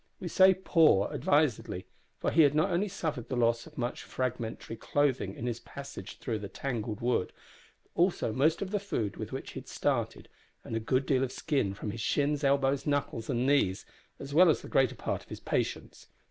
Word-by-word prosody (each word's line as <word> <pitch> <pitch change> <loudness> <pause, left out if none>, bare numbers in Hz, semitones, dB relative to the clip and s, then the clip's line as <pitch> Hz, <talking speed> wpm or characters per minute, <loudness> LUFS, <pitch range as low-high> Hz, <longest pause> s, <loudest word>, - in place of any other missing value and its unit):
We 175 - -5
say 190 +2 +6
"poor" 160 - +4
advisedly, 140 -11 +1 0.3
for - - -1
he 165 - +5
had 145 -1 +5
not 155 +5 +2
only 180 +4 +1
suffered 155 - -4
the 130 - -1
loss 115 +1 +1
of 155 - -16
much 120 -1 -2
fragmentary 120 -3 -4
clothing 130 -6 0
in 120 - -6
his 120 -1 -2
passage 140 -8 -9
through 110 -3 -3
that 100 -1 -9
tangled 115 -5 -3
wood, 120 -6 0 0.5
but - - -36
also 175 - +1
most 155 - +2
of 190 - -6
the 205 - +1
food 115 - -3
with - - -6
which - - -5
he - - -6
had - - -14
started, - - -1 0.4
and 115 - -5
a - - +1
good 130 +4 0
deal 130 -1 +2
of 130 - -2
skin 135 - -1
from 105 +1 -4
his 115 +2 -6
shins, 145 +4 +1
elbows, 140 0 +2
knuckles, 145 -6 -1
and 125 -1 0
knees, 135 -10 +2 0.3
as 140 +1 -8
well 175 +3 +7
as 155 - +2
the - - -8
greater 130 -3 +2
part - - -3
of - - -19
his - - -7
patience. - - -3
135 Hz, 205 wpm, -30 LUFS, 115-150 Hz, 0.5 s, well